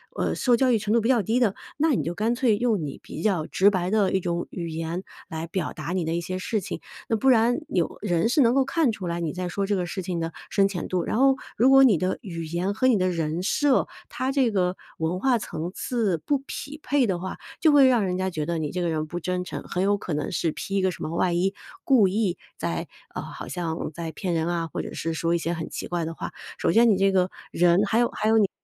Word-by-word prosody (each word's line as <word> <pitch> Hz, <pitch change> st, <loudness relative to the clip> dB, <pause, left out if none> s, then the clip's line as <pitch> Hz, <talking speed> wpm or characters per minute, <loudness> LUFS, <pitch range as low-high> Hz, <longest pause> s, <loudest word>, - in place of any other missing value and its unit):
呃， -, -, 0 dB
受 245 Hz, -2 st, +3 dB
教 255 Hz, +1 st, +3 dB
育 230 Hz, -, +4 dB
程 210 Hz, +1 st, -1 dB
度 235 Hz, -, +4 dB
比 225 Hz, -, 0 dB
较 245 Hz, -4 st, +4 dB
低 225 Hz, +4 st, 0 dB
的， 210 Hz, -5 st, +3 dB, 0.2 s
那 315 Hz, +2 st, +3 dB
你 225 Hz, -, +1 dB
就 170 Hz, -, -2 dB
干 220 Hz, +6 st, 0 dB
脆 240 Hz, -3 st, +3 dB
用 230 Hz, -5 st, +1 dB
你 140 Hz, -, -6 dB
比 -, -, -7 dB
较 190 Hz, -8 st, +1 dB
直 195 Hz, +2 st, +4 dB
白 185 Hz, -2 st, -1 dB
的 210 Hz, -3 st, +3 dB
一 190 Hz, -, +3 dB
种 170 Hz, 0 st, -2 dB
语 170 Hz, -2 st, -5 dB
言 165 Hz, +3 st, -4 dB, 0.2 s
来 160 Hz, 0 st, -5 dB
表 170 Hz, -1 st, -3 dB
达 155 Hz, +1 st, -5 dB
你 180 Hz, -2 st, -1 dB
的 160 Hz, -, -1 dB
一 170 Hz, -, -1 dB
些 185 Hz, +2 st, -4 dB
事 210 Hz, +3 st, -1 dB
情， -, -, -5 dB, 0.3 s
那 225 Hz, -, +2 dB
不 265 Hz, -, 0 dB
然 240 Hz, 0 st, +4 dB
有 175 Hz, -3 st, -1 dB
人 175 Hz, 0 st, +1 dB
是 295 Hz, -, +2 dB
能 240 Hz, -1 st, +5 dB
够 275 Hz, -, +4 dB
看 275 Hz, 0 st, +1 dB
出 190 Hz, -4 st, -5 dB
来 170 Hz, 0 st, -2 dB
你 165 Hz, -3 st, -2 dB
在 180 Hz, -1 st, -3 dB
说 200 Hz, +3 st, -1 dB
这 205 Hz, +1 st, 0 dB
个 180 Hz, -2 st, -1 dB
事 190 Hz, +2 st, -4 dB
情 175 Hz, -1 st, -3 dB
的 165 Hz, 0 st, -2 dB, 0.2 s
深 195 Hz, -1 st, +3 dB
浅 180 Hz, -4 st, -4 dB
度。 180 Hz, -2 st, 0 dB
然 -, -, -1 dB
后 270 Hz, +1 st, +5 dB, 0.2 s
如 250 Hz, +3 st, +5 dB
果 270 Hz, 0 st, +8 dB
你 230 Hz, -9 st, +6 dB
的 185 Hz, +3 st, -1 dB
语 170 Hz, -7 st, -6 dB
言 175 Hz, +5 st, -1 dB
和 255 Hz, +5 st, +2 dB
你 255 Hz, -, +5 dB
的 185 Hz, -1 st, +1 dB
人 165 Hz, 0 st, -2 dB
设， 285 Hz, +6 st, +2 dB, 0.2 s
它 260 Hz, +1 st, -2 dB
这 265 Hz, -4 st, +2 dB
个 185 Hz, -2 st, 0 dB, 0.2 s
文 165 Hz, +3 st, -1 dB
化 255 Hz, +2 st, +3 dB
层 170 Hz, -6 st, -5 dB
次 220 Hz, -8 st, 0 dB
不 285 Hz, -, 0 dB
匹 295 Hz, +2 st, -6 dB
配 285 Hz, -3 st, +2 dB
的 185 Hz, -3 st, -1 dB
话， 190 Hz, +1 st, -5 dB, 0.2 s
就 315 Hz, -, +5 dB
会 280 Hz, -2 st, +7 dB
让 240 Hz, -5 st, +3 dB
人 180 Hz, -1 st, -1 dB
家 190 Hz, 0 st, 0 dB
觉 155 Hz, -4 st, -3 dB
得 170 Hz, 0 st, -1 dB
你 155 Hz, -2 st, -2 dB
这 180 Hz, -, -2 dB
个 175 Hz, -, 0 dB
人 155 Hz, -1 st, -1 dB
不 175 Hz, +3 st, -4 dB
真 180 Hz, +1 st, -2 dB
诚， 180 Hz, -, -6 dB
很 180 Hz, -, -2 dB
有 205 Hz, +1 st, +3 dB
可 180 Hz, -, -5 dB
能 150 Hz, 0 st, -2 dB
是 165 Hz, -1 st, 0 dB
披 195 Hz, -, -5 dB
一 195 Hz, -, +2 dB
个 185 Hz, -, +2 dB
什 -, -, -8 dB
么 -, -, -3 dB
外 175 Hz, 0 st, +2 dB
衣 185 Hz, +3 st, +1 dB, 0.3 s
故 245 Hz, -8 st, +5 dB
意 195 Hz, -1 st, 0 dB, 0.2 s
在， -, -, -3 dB, 0.3 s
呃 -, -, -4 dB
好 -, -, -8 dB
像 165 Hz, -3 st, -3 dB
在 165 Hz, 0 st, -5 dB
骗 185 Hz, -4 st, -2 dB
人 165 Hz, 0 st, 0 dB
啊， 170 Hz, -1 st, -1 dB
或 -, -, -3 dB
者 -, -, -7 dB
是 165 Hz, 0 st, -3 dB
说 165 Hz, +1 st, 0 dB
一 -, -, +3 dB
些 170 Hz, +1 st, -2 dB
很 165 Hz, -1 st, -5 dB
奇 -, -, -5 dB
怪 175 Hz, -2 st, -2 dB
的 165 Hz, -, -4 dB
话。 -, -, -6 dB, 0.3 s
首 -, -, +1 dB
先 230 Hz, +5 st, +5 dB
你 205 Hz, -, +5 dB
这 195 Hz, +1 st, +3 dB
个 185 Hz, -1 st, +2 dB, 0.2 s
人 175 Hz, +3 st, +4 dB
还 220 Hz, +3 st, +1 dB
有 240 Hz, -, +3 dB
还 215 Hz, -, -1 dB
有 225 Hz, -, +5 dB
你 205 Hz, -3 st, +4 dB
185 Hz, 295 characters per minute, -25 LUFS, 170-225 Hz, 0.3 s, 果